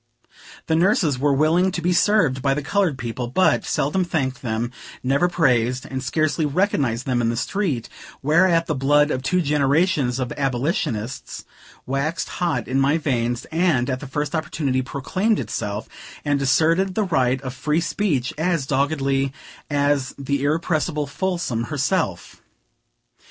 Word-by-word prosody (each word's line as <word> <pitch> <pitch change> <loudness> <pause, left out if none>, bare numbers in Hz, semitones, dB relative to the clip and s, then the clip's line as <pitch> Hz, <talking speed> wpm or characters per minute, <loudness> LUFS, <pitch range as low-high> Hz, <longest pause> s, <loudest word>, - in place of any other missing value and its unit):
The 160 - 0
nurses 165 -6 +2
were 145 +1 +2
willing 160 +6 +3
to 180 - -2
be 175 +1 +1
served 175 -9 +3
by 135 0 +1
the 150 - -3
colored 180 -2 +1
people, 120 0 -4
but 160 +10 +2
seldom 165 +7 0
thanked 135 -7 -2
them, 115 0 -2 0.3
never 140 +7 +2
praised, 125 -7 +1
and 130 0 -4
scarcely 155 +4 0
recognized 140 - 0
them 125 -2 +1
in 115 - +1
the 115 - -2
street; 150 - -1 0.4
whereat 165 +3 +4
the 155 - -1
blood 145 +2 +3
of 130 - -1
two 180 +6 +1
generations 145 -2 +2
of 130 -2 -3
abolitionists 130 - -2 0.4
waxed 140 +5 -2
hot 160 -9 0
in 130 +3 0
my 140 +4 +3
veins, 120 -6 -1
and, 160 -7 +2
at 130 - -2
the 145 - -8
first 145 +4 -3
opportunity, 155 -5 -1
proclaimed 185 - -1
itself, 105 +1 -4 0.4
and 145 -1 +1
asserted 165 +7 +2
the 215 - +2
right 130 -8 +1
of 130 -1 -5
free 150 +4 0
speech 165 -7 -1
as 165 -4 0
doggedly 135 -1 0 0.4
as 145 -2 +1
the 140 0 -2
irrepressible 155 0 0
Folsom 155 -7 -2
herself. 140 - -2
145 Hz, 150 wpm, -22 LUFS, 130-165 Hz, 0.4 s, whereat